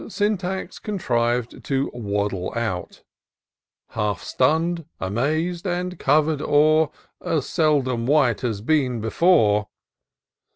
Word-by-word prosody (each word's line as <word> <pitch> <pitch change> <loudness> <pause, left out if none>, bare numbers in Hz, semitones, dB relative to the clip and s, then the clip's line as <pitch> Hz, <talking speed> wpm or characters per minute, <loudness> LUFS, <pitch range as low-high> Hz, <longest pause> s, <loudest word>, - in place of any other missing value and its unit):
Syntax 195 -3 -2
contriv'd 120 - -1
to 135 0 -1
waddle 100 -4 -2
out, 110 -6 -4 0.9
Half 105 -4 -2
stunn'd, 165 +5 +1
amaz'd, 155 - -1
and 180 +1 -3
cover'd 150 +1 +2
o'er 155 +1 +4 0.3
As 165 -6 -1
seldom 135 -7 +1
wight 135 -7 +3
had 110 -4 -3
been 130 -6 +1
before. 110 - +3
140 Hz, 95 wpm, -23 LUFS, 115-165 Hz, 0.9 s, o'er